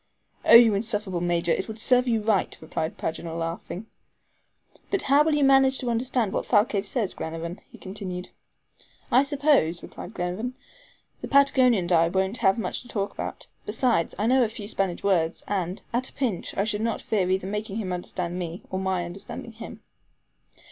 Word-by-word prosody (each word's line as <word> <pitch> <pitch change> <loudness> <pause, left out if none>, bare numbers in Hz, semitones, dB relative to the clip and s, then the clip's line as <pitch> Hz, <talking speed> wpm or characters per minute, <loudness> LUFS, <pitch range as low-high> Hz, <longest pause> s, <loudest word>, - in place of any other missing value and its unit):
"Oh, - - +7
you 230 -2 +8
insufferable 205 -4 -1
Major; 175 -1 +1
it - - 0
would 220 -1 -7
serve 250 +2 +3
you 225 -3 +1
right," 210 -3 +1
replied 160 0 -4
Paganel, 165 0 -4
laughing. 170 +4 -5 1.0
"But 390 - 0
how 280 +2 +5
will 310 -1 +2
you 295 - +2
manage 270 -1 +5
to 245 -2 -2
understand 235 -2 0
what - - -2
Thalcave 205 -2 +2
says, 220 -3 -1
Glenarvan?" 165 +2 -6
he - - -13
continued. 185 -2 -6 0.8
"I 255 - +6
suppose," 280 - +2
replied 195 - -9
Glenarvan, 195 +9 -3 0.6
"the - - -5
Patagonian 260 -7 +4
and 175 - -4
I 165 -1 +5
won't 190 +5 0
have 195 -2 +3
much 225 - -2
to 245 - -15
talk 200 -4 -3
about; - - -6 0.2
besides, 220 -5 +1
I 205 - 0
know 255 +2 +4
a 225 - 0
few 215 -2 -8
Spanish 195 -4 -1
words, 170 -4 +1
and, 185 -2 -2
at 250 +2 0
a - - -18
pinch, 240 -10 -3
I 195 - +2
should 210 0 -1
not 230 0 -1
fear 195 -4 0
either 190 0 0
making 210 +1 -4
him 190 -5 -3
understand 180 0 -4
me, 170 0 -5
or 190 - -2
my 190 -2 -1
understanding 195 +6 -7
him." 225 +1 -10
205 Hz, 180 wpm, -26 LUFS, 180-240 Hz, 1.0 s, you